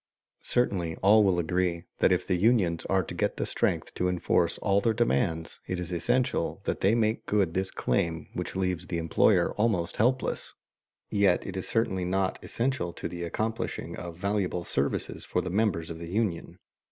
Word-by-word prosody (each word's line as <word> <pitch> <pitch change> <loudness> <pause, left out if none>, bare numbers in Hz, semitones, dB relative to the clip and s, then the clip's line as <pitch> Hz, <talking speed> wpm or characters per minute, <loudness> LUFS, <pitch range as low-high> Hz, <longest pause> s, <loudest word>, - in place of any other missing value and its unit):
Certainly 90 -9 0
all 105 +2 +7
will 95 -3 +3
agree 85 0 0 0.2
that - - +4
if - - +2
the - - 0
unions 90 -3 +2
are 95 -1 +2
to - - -7
get - - -1
the - - -1
strength - - -1
to 90 - 0
enforce 90 -1 +1
all 100 0 +2
their 115 0 +1
demands 80 - 0
it 90 - -2
is 90 -1 -5
essential 120 +9 0
that - - -2
they 100 +4 +4
make 110 -1 0
good 100 -6 +2
this 95 +1 -1
claim 80 +6 -1
which - - -4
leaves 90 -2 -1
the 85 - -2
employer 80 -2 +3
almost 105 -6 0
helpless. 130 +4 0 0.6
Yet 100 -3 +3
it 95 -1 -4
certainly 115 -5 0
is 90 - -2
not 95 0 0
essential 115 -9 -1
to - - -5
the 85 - -7
accomplishing 110 +6 -3
of 85 -1 -7
valuable 95 -2 -1
services 70 -3 -2
for - - -1
the 90 - -3
members 95 -5 0
of 80 - -7
the 85 - -7
union. 95 -4 -2
95 Hz, 180 wpm, -28 LUFS, 85-105 Hz, 0.6 s, all